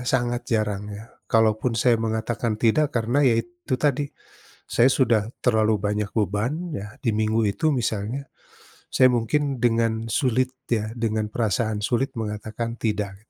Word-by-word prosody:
sangat 120 Hz, -1 st, 0 dB
jarang 105 Hz, -2 st, -1 dB
ya. 105 Hz, +1 st, -8 dB, 0.2 s
Kalaupun, 110 Hz, +1 st, +2 dB
saya 115 Hz, 0 st, +3 dB
mengatakan 110 Hz, 0 st, -1 dB
tidak 120 Hz, +7 st, +3 dB
karena 120 Hz, +5 st, +1 dB
ya 125 Hz, -5 st, +4 dB
itu 175 Hz, +1 st, -3 dB
tadi, 145 Hz, 0 st, 0 dB, 0.6 s
saya 125 Hz, +2 st, +4 dB
sudah 115 Hz, -5 st, +3 dB, 0.2 s
terlalu 110 Hz, -3 st, +2 dB
banyak 105 Hz, -1 st, -1 dB
beban 105 Hz, +4 st, 0 dB, 0.2 s
ya 100 Hz, +2 st, -6 dB
di 115 Hz, -, +1 dB
minggu 110 Hz, +1 st, +1 dB
itu 155 Hz, +9 st, +1 dB
misalnya. 120 Hz, +2 st, -2 dB, 0.6 s
Saya 130 Hz, -, +6 dB
mungkin 135 Hz, +3 st, 0 dB
dengan 115 Hz, -1 st, +1 dB
sulit 130 Hz, 0 st, +1 dB, 0.2 s
ya 110 Hz, -1 st, 0 dB
dengan 110 Hz, -2 st, -1 dB
perasaan 110 Hz, -1 st, 0 dB
sulit 130 Hz, +4 st, 0 dB
mengatakan 110 Hz, +2 st, -4 dB
tidak, 105 Hz, -3 st, -1 dB
115 Hz, 140 wpm, -24 LUFS, 110-125 Hz, 0.6 s, Saya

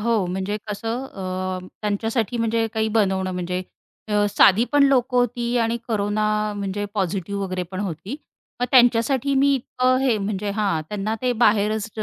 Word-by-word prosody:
हो, 220 Hz, -3 st, +1 dB
म्हणजे 190 Hz, +3 st, -2 dB
कसं 225 Hz, +5 st, -3 dB
अ, 185 Hz, -2 st, -4 dB, 0.2 s
त्यांच्यासाठी 220 Hz, +2 st, -1 dB
म्हणजे 230 Hz, 0 st, +1 dB
काही 220 Hz, 0 st, +1 dB
बनवणं 190 Hz, -4 st, +1 dB
म्हणजे 180 Hz, 0 st, -3 dB, 0.5 s
अ, 210 Hz, -1 st, +2 dB
साधी 205 Hz, +2 st, +5 dB
पण 290 Hz, -, +5 dB
लोकं 255 Hz, -2 st, +3 dB
होती 245 Hz, 0 st, +1 dB
आणि 230 Hz, 0 st, +1 dB
कोरोना 210 Hz, -1 st, 0 dB, 0.2 s
अ, -, -, -5 dB
म्हणजे 200 Hz, 0 st, -3 dB
पॉझिटिव्ह 195 Hz, 0 st, -2 dB
वगैरेपण 185 Hz, 0 st, -4 dB
होती. 195 Hz, -, -5 dB, 0.4 s
मग 245 Hz, -, +1 dB
त्यांच्यासाठी 250 Hz, +2 st, +4 dB
मी 280 Hz, +1 st, +4 dB
इतकं 255 Hz, 0 st, +1 dB
हे 240 Hz, -5 st, +3 dB
म्हणजे 200 Hz, 0 st, -2 dB
हां, 195 Hz, -7 st, +1 dB
त्यांना 210 Hz, +1 st, -2 dB
ते 250 Hz, -, +2 dB
बाहेरच 215 Hz, 0 st, +2 dB
210 Hz, 155 wpm, -22 LUFS, 195-235 Hz, 0.5 s, साधी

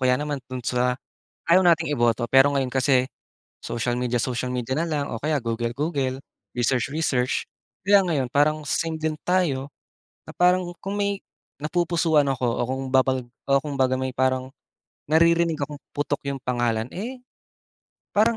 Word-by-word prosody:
kaya 125 Hz, 0 st, +4 dB
naman 145 Hz, -2 st, -3 dB
dun 130 Hz, -, -4 dB
sa, 125 Hz, 0 st, +1 dB, 0.5 s
ayaw 185 Hz, +3 st, +6 dB
nating 165 Hz, -2 st, +4 dB
iboto 120 Hz, -1 st, +1 dB
pero 135 Hz, +2 st, +6 dB
ngayon 135 Hz, -2 st, +1 dB
kasi, 130 Hz, 0 st, +2 dB, 0.5 s
social 120 Hz, +1 st, -2 dB
media, 125 Hz, -1 st, -1 dB
social 125 Hz, +1 st, -1 dB
media 125 Hz, 0 st, -3 dB
na 165 Hz, -, 0 dB
lang, 145 Hz, -3 st, -2 dB
o 115 Hz, -, -4 dB
kaya 155 Hz, +1 st, 0 dB
Google, 115 Hz, 0 st, -2 dB
Google, 140 Hz, -4 st, -1 dB, 0.4 s
research, 125 Hz, 0 st, +1 dB
research. 135 Hz, -4 st, 0 dB, 0.4 s
Kaya 200 Hz, 0 st, +6 dB
ngayon 140 Hz, -7 st, 0 dB
parang 150 Hz, +2 st, +2 dB
same 160 Hz, +3 st, -1 dB
din 155 Hz, -1 st, -2 dB
tayo, 160 Hz, -7 st, +1 dB, 0.6 s
na -, -, -10 dB
parang 180 Hz, 0 st, +2 dB
kung 200 Hz, +1 st, -3 dB
may 200 Hz, -1 st, 0 dB, 0.4 s
napupusuhan 165 Hz, -2 st, +2 dB
ako 135 Hz, -2 st, -2 dB
o 115 Hz, -, -1 dB
kung 130 Hz, +2 st, -3 dB
babag 130 Hz, 0 st, +3 dB, 0.2 s
o 140 Hz, -, 0 dB
kung 145 Hz, -2 st, -4 dB
baga 130 Hz, -1 st, +3 dB
may 130 Hz, 0 st, -2 dB
parang, 130 Hz, 0 st, 0 dB, 0.6 s
naririnig 165 Hz, +1 st, +4 dB
akong 145 Hz, +1 st, -4 dB, 0.2 s
putok 145 Hz, 0 st, -1 dB
yung 135 Hz, -, -6 dB
pangalan 120 Hz, -2 st, 0 dB
eh. 245 Hz, +7 st, -6 dB, 0.9 s
Parang 225 Hz, +3 st, +3 dB
140 Hz, 160 wpm, -24 LUFS, 125-165 Hz, 0.9 s, ayaw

